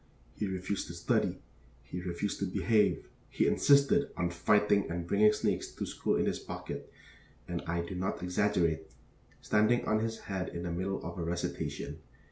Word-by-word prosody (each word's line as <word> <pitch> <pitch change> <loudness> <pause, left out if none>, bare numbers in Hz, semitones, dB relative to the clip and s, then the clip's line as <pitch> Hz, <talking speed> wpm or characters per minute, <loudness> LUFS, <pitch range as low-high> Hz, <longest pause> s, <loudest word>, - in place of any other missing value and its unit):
He 105 - -2
refused 95 +1 -2
to 85 - -7
study, 85 - 0 0.4
he 90 - -6
refused 90 +3 -3
to 100 - 0
behave, 105 +3 +2 0.2
he - - +1
insisted 140 0 +4
on 85 -1 0
fighting 100 +2 +3
and 85 0 -3
bringing 105 +4 +5
snakes 105 - -1
to - - -3
school - - -1
in - - +2
his - - 0
pocket - - -7 0.6
and 85 -1 -3
I 85 +1 0
do 85 - -6
not 90 0 -2
exaggerate 90 -4 +1 0.5
standing 110 +3 +3
on 110 0 +2
his 110 0 -3
head 95 -2 -3
in 85 - -5
the 85 - -3
middle 95 +3 -2
of - - -5
a - - -1
recitation. 85 +1 -3
95 Hz, 170 wpm, -31 LUFS, 85-105 Hz, 0.6 s, bringing